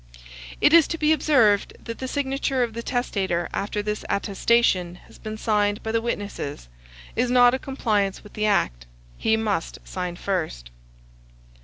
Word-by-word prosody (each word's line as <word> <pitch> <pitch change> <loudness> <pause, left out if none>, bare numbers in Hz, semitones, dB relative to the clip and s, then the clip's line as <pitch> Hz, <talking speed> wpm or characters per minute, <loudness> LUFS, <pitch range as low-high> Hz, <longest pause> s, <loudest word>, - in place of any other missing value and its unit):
It 295 - +5
is 335 -3 +7
to 330 - -3
be 310 0 +3
observed 255 -9 +3
that 230 -1 -6
the 260 - -4
signature 270 -1 0
of 235 -2 -3
the 235 - -4
testator 195 -9 -1
after 205 +1 -2
this 210 0 -3
attestation 200 -3 +1
has - - -17
been 215 -1 -6
signed 210 -1 0
by 220 - -2
the 225 0 +1
witnesses, 200 - -4 0.5
is 245 +1 +1
not 245 0 +6
a 260 - 0
compliance 210 -8 -1
with 210 - -14
the 215 0 0
act; - - 0 0.3
he 220 0 +2
must 210 -6 -2
sign 180 -2 -4
first. 160 - -3
215 Hz, 160 wpm, -24 LUFS, 195-245 Hz, 0.5 s, is